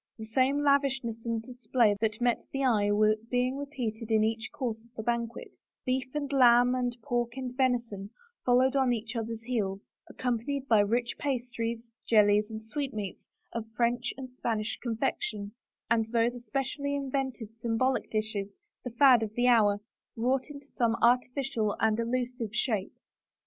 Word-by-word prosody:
The 220 - -7
same 265 +6 +2
lavishness 270 -5 +1
and 230 -1 -1
display 245 -3 +1
that 215 -1 0
met 245 -1 +2
the 275 0 -1
eye 215 -5 +3
were 215 +1 +4
being 250 +1 +1
repeated 245 -6 -4
in 220 -1 +4
each 220 0 -1
course 240 -7 -4
of 235 - -24
the 220 - -5
banquet 235 0 -3 0.3
Beef 255 0 0
and 285 -1 -2
lamb 245 -1 +6
and 245 -1 -1
pork 240 -2 -1
and 255 -2 -4
venison 235 -6 0 0.3
followed 255 +2 +4
on 260 -3 +3
each 225 +1 -4
other's 230 0 -4
heels, 210 -5 -3 0.2
accompanied 255 +3 -2
by 220 -4 +5
rich 235 +4 +1
pastries, 235 -4 -3 0.2
jellies, 210 -1 +4
and 220 0 -7
sweet 275 +2 -4
meats 200 -3 -6 0.2
of 225 -1 -4
French 240 0 +1
and 265 -1 -6
Spanish 230 -4 -2
confection 215 -3 -2 0.4
and 225 -1 +2
those 235 0 +2
espe 250 +3 -2
cially 285 +1 -3
invented 265 -5 -3
symbolic 235 +3 0
dishes, 215 -2 -3 0.3
the 250 - -4
fad 245 0 +6
of 220 -1 -4
the 245 - +2
hour, 210 -4 +4 0.4
wrought 255 +4 0
into 285 -1 -10
some 235 -3 +2
artificial 245 -2 +2
and 220 0 +2
allusive 240 -1 -2
shape. 215 -6 0
235 Hz, 160 wpm, -29 LUFS, 220-255 Hz, 0.4 s, lamb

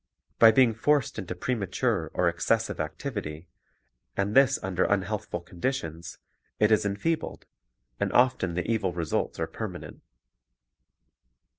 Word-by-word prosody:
By 115 -1 +9
being 120 0 +4
forced 140 +2 +1
into 95 - -5
premature 115 -7 -1
or 90 - +2
excessive 115 +7 0
activity, 80 - -5 0.7
and 100 +1 0
this 135 0 +5
under 95 -1 0
unhealthful 100 -2 -1
conditions, 85 - -4 0.4
it 105 0 +3
is 110 -1 +3
enfeebled, 100 +12 -2 0.5
and - - 0
often 120 -9 +2
the 90 - -1
evil 105 -6 0
results 85 -2 -2
are - - +1
permanent. - - -7
100 Hz, 120 wpm, -27 LUFS, 85-115 Hz, 0.7 s, By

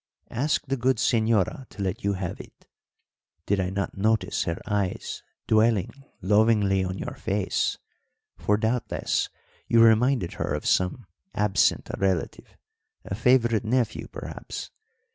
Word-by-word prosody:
"Ask 140 +5 0
the 135 0 -1
good 130 +2 +2
señora 115 - +1
to 100 - -6
let 95 -1 -3
you 100 0 +1
have 95 -3 -4
it. - - -18 0.8
Did 100 -1 +1
I 90 -1 0
not 100 +1 -3
notice 105 -2 +1
her 85 0 -2
eyes 100 -3 -2 0.2
dwelling 110 -3 +3 0.3
lovingly 105 -1 +3
on 95 0 -3
your - - -5
face 100 0 -1 0.6
for, 105 - +1
doubtless, 115 +2 -1 0.4
you 115 - +4
reminded 115 -2 +4
her - - 0
of - - -5
some 95 +6 +1 0.3
absent 100 -3 +2
relative, 95 -4 -2 0.5
a - - -5
favourite 120 0 +3
nephew, 115 -1 0
perhaps. - - -7
105 Hz, 130 wpm, -26 LUFS, 95-115 Hz, 0.8 s, you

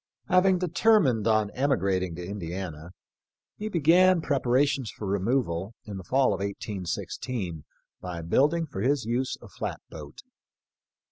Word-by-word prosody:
Having 185 +1 +4
determined 175 - +3
on 110 -2 +2
emigrating 95 - 0
to 90 +1 -6
Indiana, 90 -4 -6 0.7
he 215 +1 -4
began 180 +1 +5
preparations 135 -3 +1
for 105 - -7
removal 100 -1 -1
in 100 -2 -6
the 95 - -7
fall 130 +7 +2
of - - -4
18 100 -1 -4
16 90 - -4 0.4
by 85 -2 -5
building 150 - +2
for 95 -10 -6
his 130 +1 +1
use 125 +3 -1
a - - -10
flat - - -5
boat. 75 -2 -10
115 Hz, 135 wpm, -27 LUFS, 95-145 Hz, 0.7 s, began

